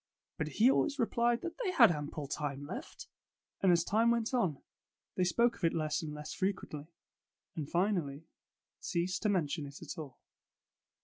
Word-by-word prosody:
But 155 - 0
he 240 +5 +7
always 290 +1 +1
replied 235 -1 +2
that 345 +7 -6
they 465 -6 0
had 350 - +7
ample 150 -1 -4
time 145 0 -3
left. - - -7 0.5
And 190 - +5
as 170 -1 +4
time 225 +5 +3
went 235 +1 +1
on, 185 - +1 0.6
they 185 - +2
spoke 230 +7 +3
of - - -18
it 165 - +2
less 155 0 0
and 155 -2 -5
less 150 0 -6
frequently, 185 -6 -3 0.7
and 150 -3 -4
finally 170 -6 0 0.5
ceased 180 +1 -1
to 215 - +1
mention 160 -5 0
it 140 +1 -10
at 175 - -7
all. 140 -5 -8
175 Hz, 170 wpm, -33 LUFS, 150-225 Hz, 0.7 s, he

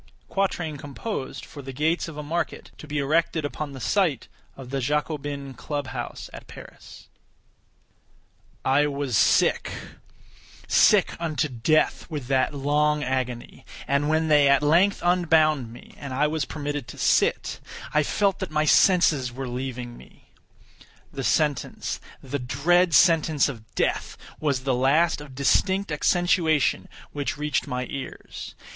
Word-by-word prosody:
[Quatrain 175 -6 -1
composed 140 - -6
for 145 - -10
the 135 0 -7
gates 155 +7 0
of 160 -2 -9
a 150 - -5
market 170 +4 -3
to 150 - -10
be 150 0 -3
erected 155 +2 +1
upon 145 0 -4
the 135 - -8
site 165 - 0 0.3
of 130 -2 -10
the 135 - -1
Jacobin 145 0 -2
Club 145 +3 -4
House 130 -2 -6
at - - -10
Paris.] - - -13 1.6
I 145 +3 +3
was 140 -4 -2
sick—sick - - +1
unto 155 -2 -1
death 135 +7 +1
with 150 -5 -5
that 130 -1 +2
long 150 +1 +1
agony; 125 -2 -3 0.2
and 140 +2 +1
when 160 +1 +2
they 150 -2 +5
at 140 +1 +4
length 175 +7 +3
unbound 155 -8 +3
me, 120 - -14
and 140 -2 -6
I 145 +3 +2
was 155 0 -1
permitted 145 -4 -4
to - - -10
sit, - - +1 0.3
I 150 - +4
felt 195 +6 0
that 190 - -4
my 155 0 +1
senses 155 -8 +4
were 130 +1 -6
leaving 125 -1 -5
me. - - -19 0.8
The - - -4
sentence—the 145 -1 -2
dread 160 +7 +2
sentence 160 -4 +4
of 115 -6 -8
death—was 140 -4 -2
the 135 -1 +1
last 145 +6 +2
of 140 -3 -11
distinct 190 +7 +1
accentuation 165 0 +2 0.2
which 145 -1 -3
reached 150 0 -1
my 125 0 -3
ears. 135 -2 -8
145 Hz, 140 wpm, -25 LUFS, 135-160 Hz, 1.6 s, they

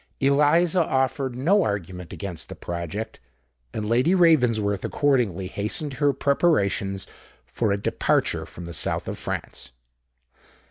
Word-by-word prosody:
Eliza 150 +6 +4
offered 130 -2 0
no 175 +11 +3
argument 90 - -3
against 95 -5 -5
the - - -7
project; 85 +6 -5 0.5
and 105 - -4
Lady 125 - +3
Ravensworth 120 - +3
accordingly 120 - +1
hastened 105 +10 -3
her 145 -1 +5
preparations 115 - +1 0.4
for 100 - -1
a 100 - +1
departure 100 - 0
from 90 - -9
the 85 - -7
south - - -2
of - - -4
France. - - -5
115 Hz, 125 wpm, -24 LUFS, 100-145 Hz, 0.5 s, her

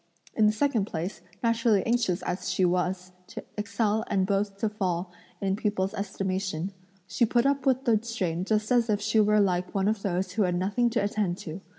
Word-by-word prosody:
In 215 - +4
the - - +5
second 225 -2 +1
place, 175 0 -5 0.2
naturally 230 -3 +2
anxious 230 -7 +1
as 180 +1 -3
she 185 - +2
was 180 +1 -1 0.2
to - - -8
excel 210 +1 0
and 195 -2 +1
both 195 0 -1
to 220 - 0
fall 185 -4 -2 0.3
in 195 -1 0
people's 200 -2 -1
estimation, 190 -2 -3 0.3
she 235 - 0
put 240 +2 +3
up 275 -1 +1
with 260 0 +2
the 225 -4 +4
strain 185 -7 -2
just 215 +2 0
as 240 -2 +3
if 205 -1 +2
she 220 +1 +1
were 210 0 +4
like 180 -2 0
one 195 0 +2
of 215 -1 0
those 185 -1 -1
who 215 +4 -1
had 180 -3 +2
nothing 205 +7 +1
to 230 -3 0
attend 200 -3 -1
to. 165 +2 -7
200 Hz, 200 wpm, -27 LUFS, 185-220 Hz, 0.3 s, the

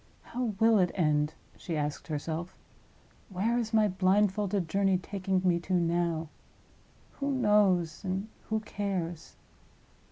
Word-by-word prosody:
"How 240 -4 -3
will 225 -1 +5
it 180 -1 +3
end?" 150 -3 +1 0.2
she 165 -3 -4
asked 150 0 -3
herself. 160 +3 -4 0.7
"Where 215 +5 0
is 225 -2 -3
my 220 -2 +4
blindfolded 195 0 +1
journey 195 +2 +2
taking 190 0 -2
me 175 -2 +3
to 180 +2 -4
now? 170 -2 0 0.9
Who 280 0 -1
knows, 210 - +2
and 190 +2 -2 0.2
who 220 0 0
cares?" 190 -6 -4
185 Hz, 125 wpm, -30 LUFS, 170-210 Hz, 0.9 s, will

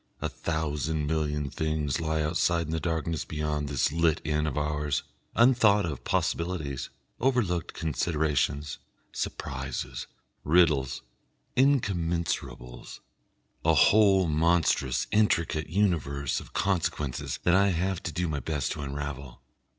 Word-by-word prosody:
A - - -2
thousand 80 -1 -2
million 75 -2 -1
things 75 -1 -1
lie 80 -1 0
outside 85 +1 +1
in 80 - -5
the 80 - 0
darkness 80 -1 -2
beyond 75 -1 -2
this 70 0 +1
lit 80 -1 +2
inn 75 0 0
of 75 - -3
ours, 75 -1 -1 0.3
unthought 115 -4 +5
of 75 -5 -5
possibilities, 80 -6 -1 0.3
overlooked 115 -10 0
considerations, 75 -2 -1 0.3
surprises, 65 0 -4 0.4
riddles, 75 -5 +3 0.5
incommensurables, 85 - 0 0.6
a 80 0 +4
whole 100 +1 +5
monstrous 80 -5 +2
intricate 85 -7 +1
universe 75 -8 0
of - - -12
consequences 80 -8 -1
that 90 - +3
I 100 +2 +5
have 95 0 0
to 85 - -4
do 85 +3 -1
my 75 -2 -2
best 75 -2 -2
to - - -4
unravel. 70 -3 -5
80 Hz, 120 wpm, -28 LUFS, 75-85 Hz, 0.6 s, unthought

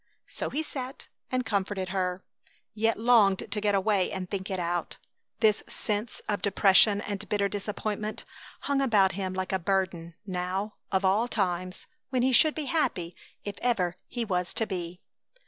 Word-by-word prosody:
So - - -4
he 310 +3 -2
sat 265 -3 -6 0.2
and 255 -1 0
comforted 200 -3 -1
her, 185 -1 -1 0.5
yet 225 0 +1
longed 220 -5 +4
to 210 - -1
get 205 -1 +2
away 195 -1 +2
and 185 -1 -4
think 190 0 -4
it 190 - -1
out. 175 -1 -2 0.4
This 215 -2 +4
sense 210 +2 -2
of 205 -3 -1
depression 200 +1 +5
and 205 -2 -5
bitter 200 -1 +2
disappointment 210 +1 -3 0.4
hung 280 -1 +1
about 210 -8 +4
him 190 -1 -3
like 185 0 -2
a 190 - +2
burden; 175 -2 -1
now, 190 +2 -2 0.2
of 190 0 +2
all 205 +5 +3
times, 185 -4 -2 0.2
when 255 -2 +1
he 260 0 +3
should 310 +5 +6
be 310 - -3
happy 185 - -1 0.3
if 205 -1 -6
ever 190 -8 +1
he 240 -2 -3
was 180 -4 -1
to 225 - +2
be! 180 -2 -5
200 Hz, 165 wpm, -28 LUFS, 185-220 Hz, 0.5 s, should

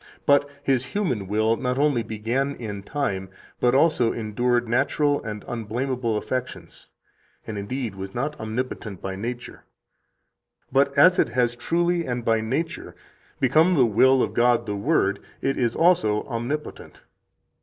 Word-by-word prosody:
But 145 0 +4
His 135 -3 +1
human 130 - -2
will 110 +3 +1
not 125 -1 -2
only 140 -4 +2
began 120 +6 -2
in 105 -4 -6
time, 100 -6 -3 0.3
but 125 +1 +3
also 140 -5 +3
endured 120 +2 0
natural 145 +5 +1
and 105 -1 -6
unblamable 120 0 -2
affections, 105 -8 -5 0.6
and 110 - -6
indeed 110 +2 -4
was 95 0 -8
not 145 +5 -2
omnipotent 110 -3 -4
by 95 0 -5
nature; 120 +5 -6 1.1
but 140 +2 +3
as 180 +5 +6
it - - +3
has 120 -1 +1
truly 170 +6 0
and 120 -2 -3
by 115 -1 +2
nature 135 +9 -3 0.4
become 160 +8 +4
the 130 -5 +5
will 130 +4 +4
of - - -3
God 120 -1 +3
the 105 -2 -3
Word, 100 -4 +1 0.2
it 135 0 0
is 120 -2 0
also 110 -12 +3
omnipotent." 130 +5 -5
120 Hz, 145 wpm, -24 LUFS, 110-140 Hz, 1.1 s, as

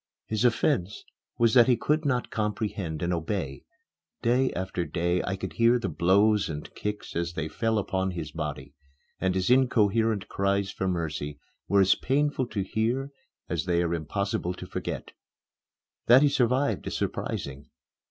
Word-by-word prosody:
His 110 +1 -1
offence 115 - +1 0.3
was 115 -1 +3
that 120 -2 +7
he 125 -2 +4
could 150 +6 0
not 125 -3 0
comprehend 105 -6 -2
and 85 +1 0
obey. 85 -4 -3 0.6
Day 125 +2 +3
after 90 -1 -2
day 85 +1 0
I 95 - -2
could 95 -4 -6
hear 115 +7 +4
the 120 - -2
blows 95 +6 +3
and 75 -2 -6
kicks 105 0 -5
as 85 0 -1
they 80 -1 -3
fell 115 +6 0
upon 95 -2 -1
his 85 -5 -5
body, 75 -3 -5 0.5
and 95 0 0
his 95 +5 +1
incoherent 115 -4 +3
cries 100 0 0
for 95 - -3
mercy 75 -5 -3 0.3
were 100 0 +4
as 95 0 +5
painful 140 -1 0
to 100 -4 -2
hear 120 +8 -1 0.4
as 85 -2 -2
they 85 -1 +2
are 85 0 -1
impossible 90 +2 -2
to - - -8
forget. - - -5 1.0
That 125 +4 +8
he 145 - +5
survived 135 0 +1
is - - -2
surprising. 70 +1 -4
100 Hz, 160 wpm, -27 LUFS, 85-115 Hz, 1.0 s, That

